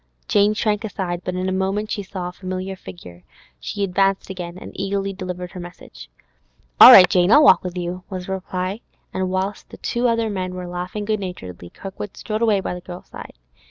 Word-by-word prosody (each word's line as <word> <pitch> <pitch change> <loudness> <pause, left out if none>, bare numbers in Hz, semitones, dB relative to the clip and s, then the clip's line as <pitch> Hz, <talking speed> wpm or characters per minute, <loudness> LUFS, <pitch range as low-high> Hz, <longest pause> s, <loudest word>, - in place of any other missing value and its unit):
Jane 205 +1 +3
shrank 210 0 0
aside; 185 -5 -3
but 180 - -3
in 185 +1 -2
a - - 0
moment 195 +3 -1
she 205 - -2
saw 185 -2 -6
a - - -5
familiar 185 +1 -5
figure; 90 - -12 0.4
she 200 - -4
advanced 195 0 +1
again, 175 -1 -6
and - - -9
eagerly 195 0 -2
delivered 180 -1 -6
her 185 - -8
message. 175 - -11 0.7
'All - - +13
right, 180 - +10
Jane! 180 0 +3
I'll 295 +4 +8
walk 190 - +8
on 180 - -2
with 180 - -10
you,' 180 +1 -4
was 185 -2 -5
the 190 - -6
reply. 190 +2 -3 0.3
And 185 0 -1
whilst 190 +2 -3
the - - -11 0.3
other 230 -1 +1
two 220 - -1
men 185 -2 -3
were 180 0 -5
laughing 180 +4 -5
good 215 0 0
naturedly, 90 - -7
Kirkwood 195 - -8
strode 215 0 -3
away 215 -4 +3
by - - -3
the 180 - -7
girl's 175 0 -10
side. - - -10
185 Hz, 210 wpm, -21 LUFS, 180-200 Hz, 0.7 s, All